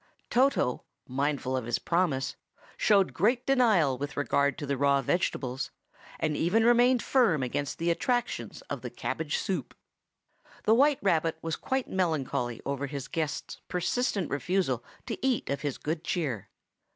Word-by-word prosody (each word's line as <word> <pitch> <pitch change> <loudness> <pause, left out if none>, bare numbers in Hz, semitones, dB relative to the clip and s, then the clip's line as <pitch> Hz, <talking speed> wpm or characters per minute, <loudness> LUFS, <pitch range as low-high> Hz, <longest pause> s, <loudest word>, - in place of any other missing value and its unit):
Toto, 250 - +2 0.2
mindful 135 0 -1
of 130 -3 -2
his 120 0 0
promise, 165 -6 0 0.4
showed 200 -3 +3
great 235 +7 +2
self - - -42
denial 215 - +3
with 145 +1 -5
regard 140 -1 +1
to 145 - -4
the 140 0 0
raw 140 0 +3
vegetables, 130 -5 -1 0.5
and 155 -1 0
even 190 +9 +2
remained 240 +1 +5
firm 195 - +3
against 135 +3 -2
the 170 +1 +1
attractions 245 +8 -1
of - - -5
the - - -5
cabbage 485 - -2
soup. - - -3 0.9
The 220 - +4
white 280 +4 +5
rabbit 165 -4 +2
was 165 -1 -1
quite 265 -1 -2
melancholy 140 -9 -1
over 140 0 -2
his 140 -1 -5
guest's 160 -3 -3
persistent 195 +1 -1
refusal 140 -3 0 0.2
to - - -5
eat 260 - +1
of 140 -1 -2
his 145 -3 -2
good 160 +2 -3
cheer. 135 - -2
160 Hz, 150 wpm, -29 LUFS, 140-220 Hz, 0.9 s, remained